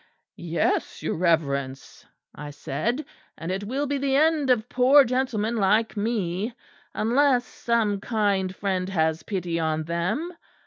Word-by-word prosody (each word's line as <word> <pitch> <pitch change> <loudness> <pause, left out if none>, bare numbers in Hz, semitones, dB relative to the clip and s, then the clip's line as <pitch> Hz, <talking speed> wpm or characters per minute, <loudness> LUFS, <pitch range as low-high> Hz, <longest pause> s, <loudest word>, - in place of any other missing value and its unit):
"'Yes, 170 -2 -1
your - - -1
Reverence,' 140 -6 -1 0.3
I 150 - -8
said, 205 - -3 0.3
'and 165 +2 -5
it 190 +2 -3
will 270 +7 -2
be 285 0 -1
the 270 0 +1
end 305 -1 +3
of 240 -2 +2
poor 260 +4 +6
gentlemen 235 -3 -1
like 215 +3 +2
me, 210 0 -2 0.4
unless 250 +2 +2
some 225 -5 0
kind 200 -4 0
friend 190 -2 -2
has 160 -3 0
pity 175 -4 -3
on 160 -1 -1
them. 180 - -2
205 Hz, 135 wpm, -25 LUFS, 170-250 Hz, 0.4 s, poor